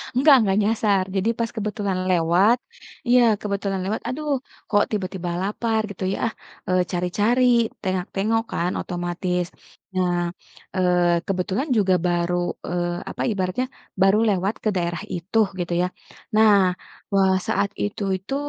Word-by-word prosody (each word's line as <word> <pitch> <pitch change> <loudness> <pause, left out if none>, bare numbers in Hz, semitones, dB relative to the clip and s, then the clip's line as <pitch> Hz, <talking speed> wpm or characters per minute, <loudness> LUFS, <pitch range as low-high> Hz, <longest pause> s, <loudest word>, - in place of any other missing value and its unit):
Enggak 280 +2 +7
enggak 200 -4 +2
nyasar 205 -3 +2
jadi 195 +3 +1
pas 230 -1 -1
kebetulan 205 -3 -2
lewat 180 +7 +4 0.5
iya 245 +1 +6 0.2
kebetulan 200 -1 -2
lewat, 210 +3 -2
"aduh 300 +4 -3 0.4
kok 205 -1 +4
tiba-tiba 185 -4 -3
lapar" 220 +3 0
gitu 200 - -7
ya, - - -6
ah, - - -2 0.4
eee, 185 0 +3
cari 180 -1 -1
cari, 235 +5 +3 0.4
tengok 185 -2 -1
tengok 225 +3 +1
kan 175 +1 0
otomatis. 175 0 -2 0.5
Nah, 180 -1 +2 0.6
eee, 180 -2 +3
kebetulan 195 - -1
juga 195 -3 +3
baru, 175 0 +1 0.3
eee, 175 0 -1
apa - - -6
ibaratnya 190 +4 -1 0.4
baru 195 +2 +5
lewat 195 +1 +1
ke 215 - +2
daerah 170 -2 -2
itu, 180 +6 -1 0.2
gitu 175 0 -2
ya. - - +1 0.5
Nah, 220 -1 +7 0.6
wah, 195 -1 +4
saat 200 - +1
itu 205 0 -3
itu, 190 +9 -5
195 Hz, 145 wpm, -23 LUFS, 180-215 Hz, 0.6 s, Enggak